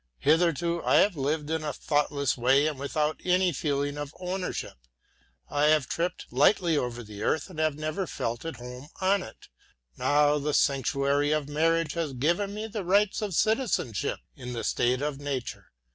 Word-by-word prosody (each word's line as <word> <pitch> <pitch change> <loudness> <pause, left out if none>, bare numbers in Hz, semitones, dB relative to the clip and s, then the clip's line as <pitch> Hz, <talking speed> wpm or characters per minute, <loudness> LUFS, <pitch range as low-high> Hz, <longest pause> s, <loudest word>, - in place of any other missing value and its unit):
Hitherto 170 +2 +2
I - - +3
have 200 -3 +4
lived 150 +2 -1
in 160 -1 -1
a 150 - -2
thoughtless 145 -2 0
way 135 +4 +3
and 150 -3 -2
without 150 +2 -1
any 180 -1 +2
feeling 145 0 -1
of 145 0 -6
ownership; 180 - -4 0.6
I 145 +1 +1
have 150 -3 +4
tripped 175 +2 -2
lightly 165 +5 +4
over 120 -3 -2
the 105 -1 -10
earth 160 - 0
and 160 - -8
have 155 -2 +1
never 155 +5 -3
felt 120 -3 -3
at 165 - -5
home 125 +3 -9
on 195 +1 +2
it. 110 - -11 0.5
Now 150 0 +3
the 150 +1 -1
sanctuary 140 +1 +2
of 155 -2 0
marriage 165 +1 +1
has 165 -5 -2
given 170 +10 0
me 215 +1 -4
the 215 -2 -4
rights 200 +4 +2
of 205 -5 -2
citizenship 215 - 0 0.2
in 125 -1 -7
the 115 - -4
state 125 +3 +1
of 145 -2 -2
nature. 140 -4 -5
150 Hz, 175 wpm, -27 LUFS, 140-170 Hz, 0.6 s, have